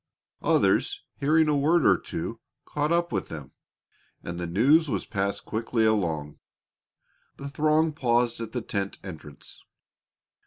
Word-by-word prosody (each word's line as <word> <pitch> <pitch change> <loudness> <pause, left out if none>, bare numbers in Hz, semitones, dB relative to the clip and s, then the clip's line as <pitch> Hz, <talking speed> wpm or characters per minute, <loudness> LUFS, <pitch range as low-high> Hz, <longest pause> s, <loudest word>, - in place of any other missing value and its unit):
Others, 400 0 +2 0.2
hearing 155 +2 +3
a 150 - +2
word 155 +3 +3
or - - +6
two, - - -5 0.3
caught 150 +2 -1
up 170 0 +1
with - - -2
them, 75 -5 -8 0.7
and 85 0 -5
the 85 - -3
news 140 - +4
was - - -2
passed 100 -2 -2
quickly 115 +1 0
along. 80 -9 0 1.0
The 140 - -7
throng 155 +3 +2
paused 120 -4 +1
at 115 -1 -5
the 125 -2 -3
tent 100 -2 -3
entrance. 75 -6 -10
120 Hz, 140 wpm, -26 LUFS, 100-150 Hz, 1.0 s, or